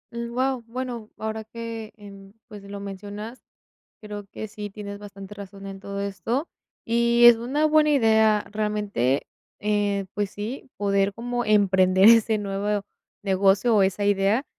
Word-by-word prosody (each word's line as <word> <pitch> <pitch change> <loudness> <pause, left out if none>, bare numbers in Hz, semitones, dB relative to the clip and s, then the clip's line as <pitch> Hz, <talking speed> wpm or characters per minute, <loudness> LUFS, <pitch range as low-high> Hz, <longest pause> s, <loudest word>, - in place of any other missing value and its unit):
Mm, 235 0 -4
guau, 255 0 0
bueno, 240 -2 -5
ahora 220 0 -4
que, 225 0 -7
em, 200 -1 -13
pues, 210 -3 -10
lo 200 0 -7
mencionas, 205 +4 -7 0.6
creo 210 -1 -8
que 220 - -6
sí 205 0 -7
tienes 200 0 -8
bastante 200 -1 -10
razón 200 -1 -10
en 195 0 -7
todo 200 0 -5
esto, 200 - -2 0.4
y 235 +1 +4
es 240 -1 +9
una 270 +6 0
buena 310 0 +4
idea, 220 -6 +4
realmente, 210 - 0 0.3
eh, 205 -1 0
pues 205 -1 -1
sí, 230 +7 -6
poder 200 -1 +1
como 245 +1 -3
emprender 190 -2 +4
ese 225 -1 +5
nuevo 200 0 -2 0.4
negocio, 195 +4 +3
o 205 - +5
esa 195 +2 +1
idea. 200 +5 +2
210 Hz, 150 wpm, -24 LUFS, 200-230 Hz, 0.6 s, es